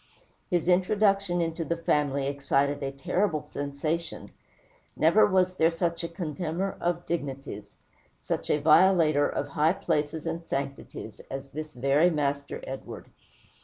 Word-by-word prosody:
His 175 -3 0
introduction 195 0 +3
into 165 0 -2
the 170 +1 -2
family 145 -4 +1
excited 140 +1 0
a 135 -1 -2
terrible 155 +4 0
sensation. 150 +4 -4 0.7
Never 170 +8 +5
was 185 -2 +2
there 160 - +5
such 170 0 -2
a - - -1
contemner 170 +2 -3
of 175 0 -1
dignities, 135 -10 -5 0.4
such - - -3
a - - +3
violator 155 -1 +5
of 145 - -3
high 150 +4 +2
places 155 -4 -1
and 165 +1 -3
sanctities, 140 -3 -5
as 135 0 -6
this 155 0 -7
very 140 +7 +3
Master 140 -3 -2
Edward. 135 0 -8
160 Hz, 130 wpm, -27 LUFS, 140-175 Hz, 0.7 s, Never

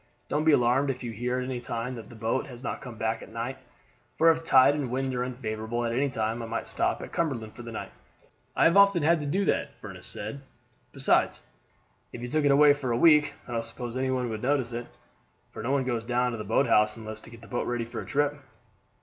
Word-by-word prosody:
Don't 150 +1 0
be 160 - +6
alarmed 130 +1 +3
if 130 -1 -3
you 120 - -4
hear 120 +3 -2
at 125 - -2
any 130 -1 -3
time 120 +1 -4
that 115 -4 -9
the 120 - -12
boat 115 +5 -1
has 125 -1 -11
not - - -4
come 125 -3 -8
back 110 +1 -1
at - - -11
night, 115 +3 -4 0.6
for 165 +1 +6
if 165 0 -2
tide 140 -3 +6
and 145 -4 -2
wind 130 +1 -1
are 125 0 -1
unfavorable 120 -2 -3
at 115 - -1
any 135 +4 +1
time 115 -1 -2
I 115 - -5
might 115 - -3
stop - - -1
at - - -9
Cumberland 125 -10 -2
for - - -9
the 115 -1 -8
night." 110 - -6 0.6
"I - - +3
have 170 - +5
often 200 -5 +6
had 165 +1 +3
to 145 - -3
do 195 +7 +1
that," - - 0
Furniss - - -8
said. 140 - -5 0.5
"Besides, - - +2 0.7
if - - -8
you 120 - -5
took 155 +2 +1
it - - +5
away 145 +1 +7
for 145 -3 -4
a 115 - +1
week, 150 +1 +5
I - - -8
don't 115 -1 -1
suppose 115 +1 -5
any 130 0 0
one 130 -1 0
would 110 -1 -4
notice 130 -2 +1
it; 120 +1 -4 0.6
for - - -7
no 115 - -3
one 140 -1 +2
goes 120 -3 -2
down 125 +1 +1
to 115 - -4
the - - -4
boathouse 105 -1 +3
unless 110 -1 -7
to - - -12
get 115 -1 -13
the - - -12
boat 120 - -2
ready 120 -1 -1
for 115 - -6
a - - -6
trip." 145 0 0
125 Hz, 250 wpm, -27 LUFS, 115-140 Hz, 0.7 s, away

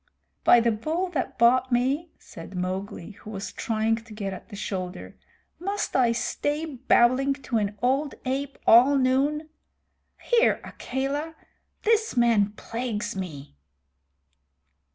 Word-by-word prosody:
"By 240 - +7
the 235 0 +2
Bull 315 - -2
that 305 -7 -3
bought 255 +2 +4
me," 270 +7 +1
said 170 +3 -11
Mowgli, 185 +1 -4
who - - -10
was 200 -2 -5
trying 225 -1 0
to 225 -1 -12
get 200 -2 -4
at - - -10
the 205 - -8
shoulder, 185 -2 -5 0.4
"must 400 +4 -3
I 245 -3 +4
stay 290 +6 -1
babbling 265 -1 +3
to 235 -4 0
an 205 0 -2
old 275 +3 +1
ape 275 +2 -2
all 255 +5 +7
noon? 280 +4 +1 0.7
Here, 475 -1 +3
Akela, 285 +5 -4 0.5
this 440 - +2
man 220 -4 +3
plagues 230 -1 -4
me." 150 - -7
245 Hz, 130 wpm, -26 LUFS, 210-280 Hz, 0.7 s, By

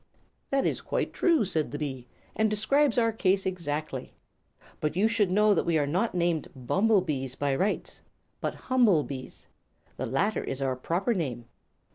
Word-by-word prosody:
"'" - - -44
"That 275 0 +1
is - - 0
quite - - -2
true," 330 - +3
said 160 -5 -1
the 145 - -5
bee, 135 -4 -5 0.3
"and 220 0 +2
describes 240 +6 +2
our 230 -1 +3
case 195 -3 +1
exactly. 155 -5 -3 0.6
But 150 +1 -1
you 200 +4 +3
should 225 -4 +2
know 210 +3 +4
that 180 - +1
we 170 -2 +1
are 145 - +2
not 180 +9 0
named 170 -3 0
'bumblebees' 150 - +1
by 140 -1 0
rights, 195 +9 -2 0.4
but - - -2
'Humble 230 - +3
Bees.' 130 -2 -8 0.5
The - - -3
latter 195 - 0
is 135 - -4
our 135 -1 0
proper 175 - 0
name." 130 - -3
180 Hz, 170 wpm, -28 LUFS, 145-215 Hz, 0.6 s, know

